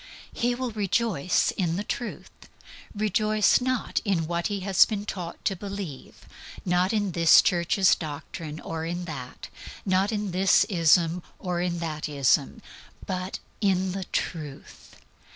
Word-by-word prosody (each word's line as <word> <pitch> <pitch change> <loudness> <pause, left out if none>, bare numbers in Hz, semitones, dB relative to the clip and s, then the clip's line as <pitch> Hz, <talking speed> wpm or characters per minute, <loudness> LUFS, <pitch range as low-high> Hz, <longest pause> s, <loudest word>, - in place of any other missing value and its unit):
He 240 +1 0
will 255 -1 -3
rejoice 205 -5 +1
in 170 -4 0
the 200 - -2
Truth 240 +2 -5 0.6
rejoice 215 +2 +2
not 255 -1 0
in 185 -6 0
what 170 +1 -1
he 205 -2 -3
has 190 -1 +5
been 205 -2 -3
taught 180 -4 -6
to 195 - +1
believe; 195 -7 -7 0.4
not 180 +1 +2
in 205 -3 0
this 165 -1 +6
church's 180 +2 +3
doctrine 155 0 -6
or 160 -1 -5
in 175 +2 -3
that; 135 -6 -8 0.4
not 190 +2 +2
in 210 -3 -2
this 190 +2 +4
ism 170 -1 +3 0.2
or 180 -2 -2
in 175 -1 -1
that 155 -2 -4
ism; 140 -3 +1 0.4
but 185 0 -3 0.2
"in 190 -2 +2
the 190 0 -4
Truth." 150 -7 -5
185 Hz, 140 wpm, -26 LUFS, 165-205 Hz, 0.6 s, this